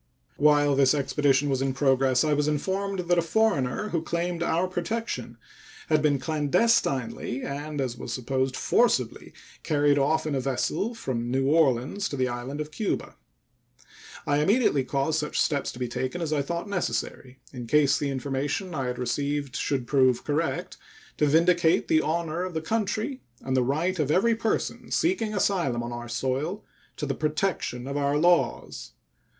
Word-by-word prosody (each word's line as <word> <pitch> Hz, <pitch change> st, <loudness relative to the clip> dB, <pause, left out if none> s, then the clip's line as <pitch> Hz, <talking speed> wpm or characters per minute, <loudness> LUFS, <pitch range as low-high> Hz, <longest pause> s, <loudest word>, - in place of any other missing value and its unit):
While 145 Hz, -1 st, +4 dB
this 135 Hz, +1 st, +4 dB
expedition 140 Hz, 0 st, +2 dB
was 135 Hz, -2 st, 0 dB
in 135 Hz, -1 st, -1 dB
progress 135 Hz, -2 st, +3 dB
I 155 Hz, -1 st, +2 dB
was 145 Hz, 0 st, +1 dB
informed 190 Hz, +5 st, -1 dB
that 175 Hz, 0 st, +2 dB
a -, -, +3 dB
foreigner 180 Hz, -, 0 dB
who 170 Hz, -4 st, -1 dB
claimed 170 Hz, +1 st, -2 dB
our 170 Hz, +2 st, +1 dB
protection 185 Hz, +6 st, -4 dB, 0.5 s
had 155 Hz, -1 st, +3 dB
been 145 Hz, -2 st, +3 dB
clandestinely 140 Hz, -, 0 dB
and, 145 Hz, +2 st, -5 dB
as 130 Hz, -3 st, -1 dB
was -, -, -6 dB
supposed, 130 Hz, +2 st, -1 dB
forcibly 130 Hz, -, +1 dB, 0.3 s
carried 145 Hz, -1 st, +2 dB
off 155 Hz, +4 st, +1 dB
in 155 Hz, -, -2 dB
a 135 Hz, -, 0 dB
vessel 135 Hz, -, -1 dB
from 120 Hz, -, -3 dB
New 135 Hz, +1 st, +1 dB
Orleans 145 Hz, +4 st, +2 dB
to -, -, -4 dB
the 130 Hz, -1 st, +1 dB
island 125 Hz, +4 st, -5 dB
of 150 Hz, 0 st, -4 dB
Cuba. 210 Hz, +5 st, -3 dB, 1.1 s
I 145 Hz, 0 st, +2 dB
immediately 195 Hz, -, +3 dB
caused 140 Hz, +4 st, 0 dB
such 150 Hz, -1 st, -2 dB
steps 145 Hz, -2 st, +1 dB
to -, -, -11 dB
be 125 Hz, 0 st, -2 dB
taken 130 Hz, +7 st, -3 dB
as 160 Hz, -3 st, -2 dB
I 145 Hz, -, +1 dB
thought 170 Hz, +7 st, -4 dB
necessary, 160 Hz, -8 st, -3 dB, 0.2 s
in 120 Hz, -2 st, -7 dB
case 145 Hz, +2 st, +3 dB
the 145 Hz, -, -1 dB
information 140 Hz, +7 st, -2 dB
I 135 Hz, -4 st, -2 dB
had 125 Hz, 0 st, -3 dB
received 140 Hz, +2 st, -2 dB
should 135 Hz, -4 st, -1 dB
prove 130 Hz, -2 st, +3 dB
correct, 155 Hz, +3 st, -2 dB, 0.4 s
to 150 Hz, -, +3 dB
vindicate 170 Hz, +2 st, +3 dB
the 155 Hz, -, +4 dB
honor 165 Hz, +1 st, -1 dB
of 185 Hz, -2 st, -5 dB
the 160 Hz, -, -1 dB
country 220 Hz, -, -2 dB, 0.2 s
and 130 Hz, 0 st, -1 dB
the 130 Hz, -, +3 dB
right 160 Hz, +8 st, 0 dB
of 150 Hz, -2 st, 0 dB
every 205 Hz, +9 st, +3 dB
person 225 Hz, 0 st, -2 dB
seeking 335 Hz, -9 st, +1 dB
an -, -, -2 dB
asylum 170 Hz, -13 st, +1 dB
on 120 Hz, 0 st, -5 dB
our 120 Hz, 0 st, -7 dB
soil 135 Hz, -, -2 dB, 0.3 s
to 150 Hz, -, -3 dB
the 135 Hz, -, -1 dB
protection 155 Hz, -4 st, -2 dB
of 140 Hz, +1 st, -3 dB
our 140 Hz, 0 st, +1 dB
laws. 160 Hz, -, +1 dB
145 Hz, 170 wpm, -26 LUFS, 130-170 Hz, 1.1 s, While